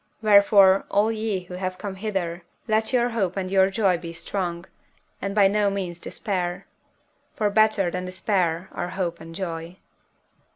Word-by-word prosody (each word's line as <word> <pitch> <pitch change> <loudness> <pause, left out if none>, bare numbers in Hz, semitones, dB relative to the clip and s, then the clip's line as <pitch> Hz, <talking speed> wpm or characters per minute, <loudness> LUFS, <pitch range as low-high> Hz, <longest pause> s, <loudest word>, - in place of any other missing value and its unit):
Wherefore, 200 -2 +6
all 210 +2 +2
ye 215 -3 -2
who 180 - -11
have 185 0 -4
come 200 0 -5
hither, 190 -4 -3 0.3
let 220 +2 +1
your 245 -1 +2
hope 200 -6 -1
and 185 -1 -3
your 190 0 +4
joy 195 -4 +1
be 170 -1 -7
strong; 170 0 -4 0.6
and 200 +1 -3
by 200 -2 +6
no 205 +1 +2
means 185 -3 -4
despair, 180 -2 -3 0.7
for 210 -1 0
better 215 -4 +3
than 180 +1 -4
despair 185 -2 -1
are 175 - -4
hope 170 -3 -2
and 165 0 -10
joy. 170 -1 -5
190 Hz, 160 wpm, -24 LUFS, 175-205 Hz, 0.7 s, Wherefore